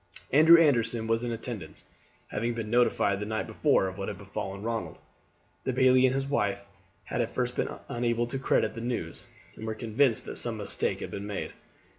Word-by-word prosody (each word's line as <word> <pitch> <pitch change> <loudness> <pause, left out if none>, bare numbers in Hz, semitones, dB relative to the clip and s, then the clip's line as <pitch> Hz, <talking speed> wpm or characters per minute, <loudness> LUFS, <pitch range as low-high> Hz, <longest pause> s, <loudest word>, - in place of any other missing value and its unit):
Andrew 160 +4 +8
Anderson 115 -7 +3
was 115 +1 0
in 120 - -2
attendance, 110 -8 -5 0.5
having 115 +2 -2
been 110 -2 -4
notified 120 -5 +2
the 105 - -3
night 110 0 -2
before 95 - +2
of 95 +1 -7
what 95 - -3
had - - -4
befallen 100 0 -6
Ronald. 115 0 -3 0.7
The 130 - -1
bailie 130 0 +5
and 130 - 0
his 135 0 0
wife 105 -8 -1 0.4
had - - -2
at - - -1
first - - -2
been - - -1 0.2
unable 120 0 0
to 130 +3 -3
credit 135 - +1
the 115 - -6
news, 115 -9 -4 0.3
and 110 - -7
were 110 - -2
convinced 115 +2 +2
that - - -5
some - - -1
mistake - - -2
had - - -5
been 100 +1 -5
made. 105 - -4
115 Hz, 195 wpm, -28 LUFS, 105-125 Hz, 0.7 s, Andrew